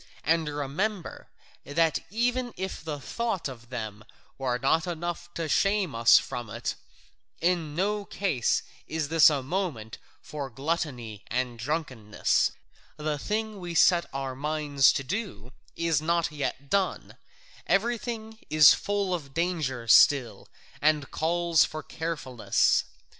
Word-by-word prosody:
And 160 0 +2
remember, 155 +7 -3 0.3
that 160 +2 +1
even 245 +3 -1
if 190 -2 -5
the 155 -3 -4
thought 225 - -2
of 120 -3 -10
them 110 -4 -6 0.4
were 125 -2 0
not 150 +7 +1
enough 175 0 -4
to 165 -1 -2
shame 195 0 +1
us 115 0 +6
from 120 -1 -3
it, 115 +3 -3 0.7
in 165 -3 0
no 205 +3 0
case 180 - 0 0.2
is 155 -2 -2
this 165 -1 +7
a 140 -3 -1
moment 135 - -3 0.2
for 145 -3 -6
gluttony 125 -6 -3
and 125 -1 -2
drunkenness: 130 -6 0 0.5
the 150 -1 -2
thing 215 +3 -3
we 175 -2 -6
set 170 +1 +5
our 135 -1 -4
minds 145 -1 +2
to 135 - -2
do 140 - -5 0.2
is 165 -3 +1
not 170 0 +1
yet 140 -2 -4
done: 195 +3 -1 0.5
everything 225 +1 -1
is 155 -1 +8
full 200 -2 -1
of 140 -6 -5
danger 155 -9 -1
still, 120 -3 +5 0.3
and 150 -2 +2
calls 170 0 +2
for 155 0 -5
carefulness. 155 -8 0
155 Hz, 130 wpm, -27 LUFS, 135-180 Hz, 0.7 s, is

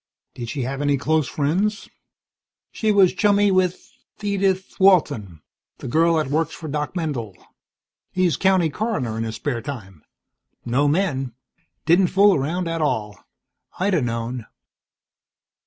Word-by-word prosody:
"Did 120 -2 -7
she 135 0 -3
have 135 +3 -3
any 145 -1 +2
close 155 0 +1
friends?" 185 - -1 0.8
"She 220 -1 0
was 195 -3 +5
chummy 205 0 +3
with 185 -1 0 0.4
Edith 195 -2 0
Walton, 140 - +3 0.3
the - - -8
girl 165 +6 +3
that 155 -2 +1
works 160 +1 0
for 160 - -8
Doc 150 +3 -3
Mendel. 130 - -3 0.7
He's 180 -5 +1
county 185 -3 +2
coroner 210 - -2
in - - -1
his 110 0 -5
spare 120 +1 -3
time. 95 - -8 0.6
No 130 +5 +2
men. 145 - 0 0.5
Didn't 175 +3 +4
fool 200 +3 +5
around 170 +4 -1
at 165 -1 -2
all. 110 -8 -1 0.6
I'd 195 +2 +1
a 165 - +2
known." 115 -1 -3
155 Hz, 140 wpm, -22 LUFS, 125-185 Hz, 0.8 s, was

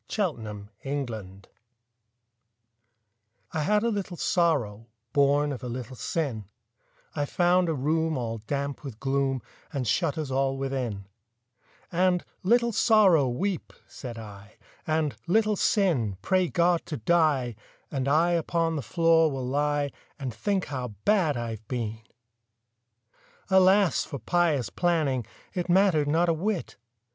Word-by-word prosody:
63 210 -2 +1 0.3
The 100 -1 -9 0.2
Penitent 110 -9 -5 2.0
I 155 - -1
had 210 +6 +2
a 235 - +2
little 195 -5 -3
Sorrow, 125 - 0 0.3
Born 145 +1 +3
of 130 -4 -5
a 125 - -4
little 125 +1 -6
Sin, 115 -2 -2 0.7
I 145 -2 0
found 180 0 +2
a 160 - 0
room 160 +3 0
all 115 -2 -3
damp 140 +6 -4
with 125 -6 -8
gloom 135 -2 0 0.3
And 130 -4 -2
shut 160 - +1
us 150 -4 -3
all 135 0 +1
within; 130 -7 -3 0.9
And, 180 0 +2 0.2
"Little 235 +4 +3
Sorrow, 195 - +4
weep," 180 +9 -2
said 120 -4 -8
I, 105 -2 -11 0.3
"And, 155 -2 0
Little 215 +3 +3
Sin, 155 - +1
pray 185 - +2
God 170 0 +2
to 150 - -4
die, 140 -4 +2 0.4
And 135 -2 -2
I 160 +5 +3
upon 165 -1 0
the - - -2
floor 165 - +3
will 135 -3 -4
lie 145 +1 0 0.3
And 130 -4 -4
think 190 - -1
how 125 -6 -5
bad 180 - +3
I've 115 -2 -5
been!" 115 -3 -3 1.5
Alas 190 0 +5
for 140 - -6
pious 150 -1 +1
planning— 150 - 0 0.3
It 180 -1 -3
mattered 175 -5 +4
not 165 +4 +2
a 165 - +3
whit! 190 +3 -2
145 Hz, 135 wpm, -27 LUFS, 125-175 Hz, 2.0 s, Alas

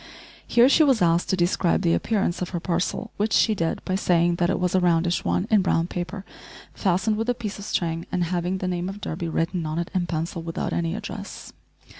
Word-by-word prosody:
Here 240 +1 +5
she 285 - +5
was 270 -6 +4
asked 170 0 +2
to - - +2
describe 175 +1 +1
the 170 -1 +3
appearance 200 -6 0
of 180 - -2
her 175 - -3
parcel, 180 +6 -2
which 215 +2 0
she 220 - +4
did, 165 -5 -2
by 185 - -2
saying 175 -2 +2
that 175 0 +1
it - - 0
was 180 -1 0
a 185 - +4
roundish 175 -1 +2
one 180 - 0
in 215 -2 +5
brown 165 -3 +1
paper, 185 +3 -5 0.5
fastened 195 +3 +1
with 225 +2 -2
a 245 - +2
piece 215 -4 -5
of 200 - -7
string, 165 -4 -2
and 180 -1 0
having 175 +2 -1
the 185 - -3
name 180 0 -2
of 195 +1 -7
Durby 170 -3 -4
written 170 +2 -1
on 155 +1 -3
it 170 0 -3
in 180 -2 0
pencil, 165 0 -3
without 165 0 -3
any 170 +1 -1
address. 205 -1 -7
180 Hz, 225 wpm, -24 LUFS, 170-200 Hz, 0.5 s, Here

